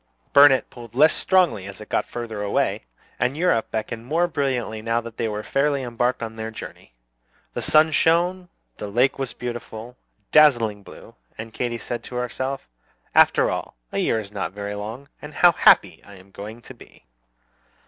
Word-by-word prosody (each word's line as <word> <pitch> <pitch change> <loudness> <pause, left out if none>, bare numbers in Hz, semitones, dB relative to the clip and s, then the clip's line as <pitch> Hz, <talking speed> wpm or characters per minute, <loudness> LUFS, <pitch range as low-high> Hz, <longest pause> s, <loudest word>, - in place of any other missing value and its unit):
Burnet 140 -2 +6
pulled 120 -2 -12
less 155 +4 +6
strongly 180 - +2
as 100 0 -9
it 105 - -10
got - - 0
farther 115 -3 -6
away, 100 -10 -1 0.3
and 125 +4 0
Europe 165 -9 +1
beckoned 110 +1 -4
more 165 +7 +1
brilliantly 130 -8 -2
now 115 +1 0
that 115 -1 -10
they 115 - -1
were 105 0 -4
fairly 140 +1 0
embarked 120 0 -1
on 110 0 -6
their 110 0 -4
journey. 85 - -11 0.6
The - - -3
sun 155 +1 +4
shone, 175 +4 +2 0.3
the 105 - -6
lake 125 +8 +1
was 135 -3 -3
a - - -34
beautiful, 120 -1 -7 0.4
dazzling 120 -9 +4
blue, - - -14 0.2
and 115 0 -8
Katy 120 -1 -2
said 120 0 -5
to 125 - -9
herself, 130 - -3 0.5
"After - - +4
all, - - -5 0.2
a - - -2
year 110 - +1
is 100 -2 -8
not 95 -4 -4
very 100 0 -5
long, 110 +7 -7
and 150 0 -10
how 175 - +6
happy - - +4
I 100 - -14
am 95 +1 -17
going 110 +4 -9
to - - -11
be!" - - -18
120 Hz, 180 wpm, -23 LUFS, 110-140 Hz, 0.6 s, Burnet